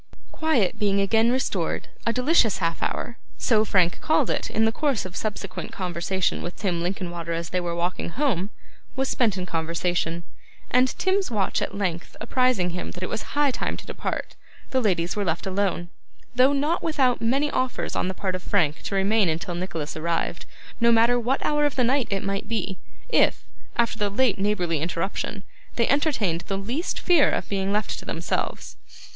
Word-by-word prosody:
Quiet 250 - +1
being 200 -2 +2
again 225 +4 +3
restored, 260 +1 -1 0.2
a - - +4
delicious 250 -2 +3
half 165 -2 -1
hour 240 - -3 0.2
so 220 -4 +3
Frank 185 -5 +2
called 310 -4 +2
it, - - -1
in 220 - +2
the 225 - +3
course 270 -5 0
of 185 0 -7
subsequent 200 -3 -4
conversation 180 0 -1
with 175 - -5
Tim 180 -5 -1
Linkinwater 175 -2 -3
as 165 0 -3
they 185 - +1
were 170 -1 -2
walking 175 +1 -2
home 205 - 0 0.5
was 265 0 0
spent 220 -6 +2
in 180 - -2
conversation, 170 0 -1 0.5
and 255 +1 +5
Tim's 380 +1 +1
watch 205 -5 0
at 200 - -3
length 180 -4 -2
apprising 240 -6 +2
him 180 - -4
that 180 - -6
it - - -2
was 220 - -5
high 290 -2 +4
time - - -2
to - - -10
depart, - - -4 0.4
the 260 - +2
ladies 180 -6 +1
were 205 - 0
left 170 +1 -1
alone, 190 -2 -1 0.4
though 255 +2 +5
not 295 +5 +1
without 270 -6 +2
many 275 +6 +2
offers 255 0 -1
on - - 0
the 185 - -3
part 190 -1 -2
of 185 - -3
Frank 165 -6 +1
to 200 - -3
remain 195 0 +3
until 165 +2 -2
Nicholas 170 -4 -4
arrived, 170 +2 -2 0.3
no 235 0 +5
matter 235 +2 +5
what 250 +3 0
hour 295 0 +2
of 290 -2 +1
the 255 - +3
night 260 +1 +2
it 195 -1 -1
might 195 +1 -2
be, 210 -4 -2 0.3
if, - - +3 0.3
after 235 -1 +1
the 205 -1 +1
late 215 0 +2
neighbourly 180 -6 0
irruption, 190 +4 -2 0.3
they 235 - +2
entertained 255 - +1
the 195 - -1
least 240 - -2
fear 345 -6 +5
of - - -1
being 195 -1 -1
left 210 +1 -1
to - - -10
themselves. - - -3
200 Hz, 185 wpm, -25 LUFS, 180-250 Hz, 0.5 s, and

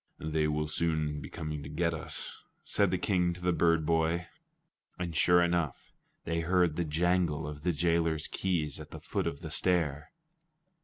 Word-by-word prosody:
"They 80 0 0
will 75 0 -1
soon 75 -1 0
be - - -8
coming 75 -2 -5
to 70 - -8
get 85 +2 0
us," 80 - -4 0.2
said - - +2
the - - +1
King 90 -3 +1
to 90 - -10
the 90 0 +1
bird 85 -2 +3
boy. 80 +1 +1 0.7
And 85 -2 -4
sure 90 +2 +5
enough, 85 -4 -1 0.3
they 85 0 -1
heard 85 -1 +2
the 85 - 0
jangle 85 0 +1
of 75 -1 -7
the 90 +3 +1
jailer's 85 -1 +1
keys 80 -7 -1
at - - -9
the - - -8
foot - - -2
of 70 - -4
the 80 - -6
stair. 80 -4 +1
80 Hz, 175 wpm, -30 LUFS, 75-85 Hz, 0.7 s, sure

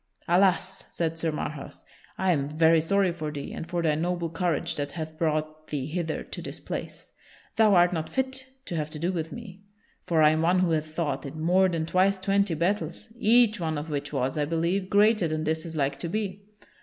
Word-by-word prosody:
"Alas!" 185 +1 +2
said 165 -1 -2
Sir 160 -1 0
Marhaus, 150 -2 -5 0.3
"I 190 -1 +2
am 140 -4 0
very 160 +1 +4
sorry 195 +2 +2
for 155 -3 -4
thee 145 -2 -6
and 165 - -6
for 175 -1 -1
thy 155 -2 +3
noble 170 +1 -1
courage 170 0 0
that 145 -1 -3
hath 160 -1 -5
brought 155 -1 -2
thee 140 -3 -3
hither 160 +1 -3
to - - -7
this - - -7
place. - - -7 0.4
Thou 215 -3 +5
art 175 0 +5
not 160 -2 -2
fit 265 0 -2 0.2
to 175 - -4
have 155 -2 -2
to 155 - -7
do 170 +4 0
with 165 -3 -3
me, 200 -5 -9 0.5
for 160 -2 +3
I 150 - +7
am 155 0 +1
one 175 +3 +3
who 180 -2 +2
hath 155 -1 0
fought 155 -4 -2
in 145 +3 -7
more 185 +4 +4
than 165 -2 -1
twice 185 +3 +3
twenty 195 -1 +1
battles, 170 +1 -1
each 235 -2 +4
one 160 -3 -1
of 150 +2 -5
which 145 -1 -3
was, 135 +1 -1
I 145 - +2
believe, 170 +5 0
greater 210 -2 +4
than 155 0 -2
this 160 +1 -1
is 165 - -7
like 140 -2 0
to 170 - -3
be. 200 0 -3
165 Hz, 215 wpm, -27 LUFS, 155-185 Hz, 0.5 s, I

